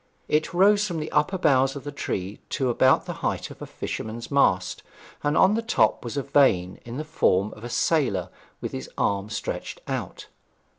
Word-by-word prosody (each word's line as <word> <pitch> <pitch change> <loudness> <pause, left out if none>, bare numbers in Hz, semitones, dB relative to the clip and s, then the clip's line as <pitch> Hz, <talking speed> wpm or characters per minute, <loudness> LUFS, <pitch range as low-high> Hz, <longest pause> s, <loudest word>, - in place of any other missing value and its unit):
It 155 +1 +1
rose 205 +3 +4
from 170 -4 -3
the 155 - -5
upper 150 +6 +2
boughs 135 -5 +3
of 140 - -7
the 145 - -5
tree 100 -8 -4
to 130 -3 0
about 130 +2 +4
the - - -4
height - - -2
of - - -13
a - - -6
fisherman's 115 +4 -6
mast, 95 -10 +2 0.4
and 145 +1 +1
on 190 +2 +6
the 225 - +1
top 225 - +2
was 120 +3 -5
a 140 - 0
vane 95 -11 +3
in 120 +2 -7
the 155 - -3
form 105 -10 +1
of 110 - -13
a 120 - -5
sailor 120 - +1 0.3
with - - -4
his 65 0 -6
arm 100 +1 0
stretched - - -4
out. - - -4
135 Hz, 195 wpm, -25 LUFS, 105-155 Hz, 0.4 s, on